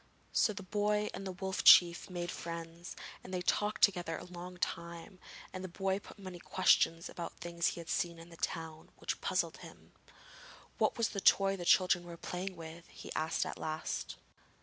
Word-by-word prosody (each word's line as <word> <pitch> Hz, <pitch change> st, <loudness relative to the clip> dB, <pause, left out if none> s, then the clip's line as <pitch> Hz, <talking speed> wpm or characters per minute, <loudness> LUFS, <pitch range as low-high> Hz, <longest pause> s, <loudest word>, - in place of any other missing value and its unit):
So -, -, +3 dB
the 200 Hz, -1 st, -7 dB
boy 210 Hz, +2 st, +1 dB
and 195 Hz, -, -5 dB
the -, -, -3 dB
Wolf 190 Hz, +1 st, -3 dB
Chief 175 Hz, +1 st, +8 dB
made 175 Hz, -1 st, -3 dB
friends, 170 Hz, +1 st, -6 dB, 0.3 s
and 185 Hz, -, -9 dB
they 180 Hz, -1 st, -2 dB
talked 210 Hz, +3 st, +1 dB
together 175 Hz, -5 st, +3 dB
a -, -, -8 dB
long 180 Hz, 0 st, -8 dB
time, 170 Hz, +3 st, -4 dB, 0.3 s
and 185 Hz, 0 st, -5 dB
the -, -, -3 dB
boy 190 Hz, +2 st, -1 dB
put 205 Hz, -, -14 dB
many 185 Hz, -3 st, -8 dB
questions 170 Hz, -2 st, +3 dB
about 170 Hz, -1 st, -6 dB
things 170 Hz, -1 st, -1 dB
he -, -, -2 dB
had 165 Hz, -, -8 dB
seen 170 Hz, -1 st, 0 dB
in 165 Hz, +1 st, -12 dB
the 165 Hz, -, -13 dB
town, 160 Hz, -1 st, -4 dB
which -, -, -3 dB
puzzled -, -, 0 dB
him. -, -, -13 dB, 0.9 s
'What -, -, +2 dB
was 230 Hz, -1 st, +2 dB
the 200 Hz, -, -3 dB
toy 195 Hz, 0 st, +5 dB
the 175 Hz, -2 st, -6 dB
children 180 Hz, -1 st, +5 dB
were 170 Hz, -1 st, -9 dB
playing 185 Hz, +2 st, -4 dB
with?' 165 Hz, 0 st, -9 dB
he -, -, -9 dB
asked 160 Hz, +1 st, 0 dB
at -, -, -6 dB
last. 155 Hz, 0 st, -3 dB
175 Hz, 190 wpm, -34 LUFS, 170-190 Hz, 0.9 s, Chief